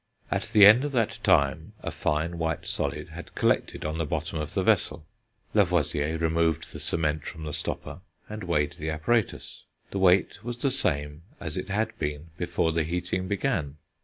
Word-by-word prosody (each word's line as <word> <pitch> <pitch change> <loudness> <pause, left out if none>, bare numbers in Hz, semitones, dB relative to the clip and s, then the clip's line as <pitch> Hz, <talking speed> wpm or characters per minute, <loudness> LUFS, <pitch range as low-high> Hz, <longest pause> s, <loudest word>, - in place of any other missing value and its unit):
At - - -1
the 105 -2 +8
end 110 +6 +8
of 145 -1 -3
that 115 -3 0
time 70 -10 +2
a - - -3
fine 80 +3 -1
white 80 -2 -1
solid - - -3
had - - -10
collected - - +1
on 80 +1 -2
the - - +1
bottom 80 +2 -2
of 75 - -5
the - - +1
vessel. 75 - +2 0.5
Lavoisier 80 -5 +2
removed 80 -1 0
the - - -6
cement 75 -2 0
from 80 0 -7
the 75 -1 -5
stopper, - - -4 0.3
and 105 -1 -6
weighed 75 -4 0
the 80 +1 -3
apparatus; 95 +8 -1 0.3
the 100 - -2
weight 95 +2 +3
was 120 0 -4
the 135 +2 +1
same 75 - -1 0.2
as 80 -3 -4
it - - -4
had 110 +3 -1
been 75 +2 -4
before 85 -1 0
the 80 +1 +1
heating 90 +3 -2
began. 95 - -1
85 Hz, 180 wpm, -27 LUFS, 75-100 Hz, 0.5 s, the